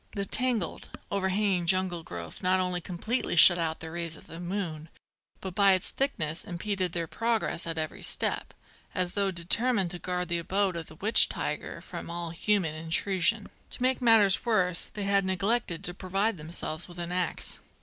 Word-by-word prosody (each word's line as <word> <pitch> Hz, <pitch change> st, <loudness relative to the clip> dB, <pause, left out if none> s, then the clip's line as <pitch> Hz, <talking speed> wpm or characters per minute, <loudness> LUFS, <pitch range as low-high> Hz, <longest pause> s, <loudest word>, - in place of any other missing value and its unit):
The 200 Hz, -2 st, -2 dB
tangled, 245 Hz, -3 st, 0 dB, 0.2 s
overhanging 190 Hz, -2 st, 0 dB
jungle 185 Hz, -1 st, +2 dB
growth 85 Hz, -, -8 dB
not 185 Hz, 0 st, +3 dB
only 180 Hz, -1 st, 0 dB
completely 195 Hz, +6 st, -1 dB
shut 175 Hz, +1 st, +8 dB
out 160 Hz, -1 st, -2 dB
the 160 Hz, 0 st, -7 dB
rays 165 Hz, -1 st, -4 dB
of -, -, -15 dB
the 165 Hz, -, -9 dB
moon, 175 Hz, -4 st, -4 dB, 0.5 s
but 190 Hz, -2 st, -5 dB
by 200 Hz, 0 st, +5 dB
its 185 Hz, -, 0 dB
thickness 165 Hz, -, -1 dB
impeded 185 Hz, -1 st, -2 dB
their 170 Hz, -1 st, -1 dB
progress 225 Hz, -3 st, -1 dB
at 165 Hz, -1 st, -3 dB
every 155 Hz, -1 st, -3 dB
step, -, -, -1 dB, 0.4 s
as 180 Hz, -1 st, 0 dB
though 200 Hz, -1 st, +1 dB
determined 190 Hz, +3 st, +1 dB
to 175 Hz, -, -6 dB
guard 180 Hz, 0 st, -2 dB
the 170 Hz, 0 st, +1 dB
abode 190 Hz, +2 st, 0 dB
of 165 Hz, -2 st, -5 dB
the 155 Hz, -, -13 dB
witch 210 Hz, +8 st, +4 dB
tiger -, -, -4 dB
from -, -, -8 dB
all 170 Hz, -1 st, -4 dB
human 180 Hz, -2 st, +1 dB
intrusion. 185 Hz, +6 st, +1 dB, 0.2 s
To -, -, -7 dB
make 260 Hz, +1 st, +1 dB
matters 220 Hz, -5 st, +5 dB
worse, 185 Hz, -7 st, +2 dB
they 205 Hz, -, -6 dB
had 200 Hz, 0 st, +2 dB
neglected 190 Hz, -1 st, -1 dB
to 175 Hz, -, -1 dB
provide 195 Hz, +4 st, -1 dB
themselves 155 Hz, +1 st, -4 dB
with 175 Hz, -1 st, -12 dB
an 175 Hz, 0 st, -4 dB
axe. 180 Hz, -2 st, -1 dB
185 Hz, 180 wpm, -28 LUFS, 170-200 Hz, 0.5 s, shut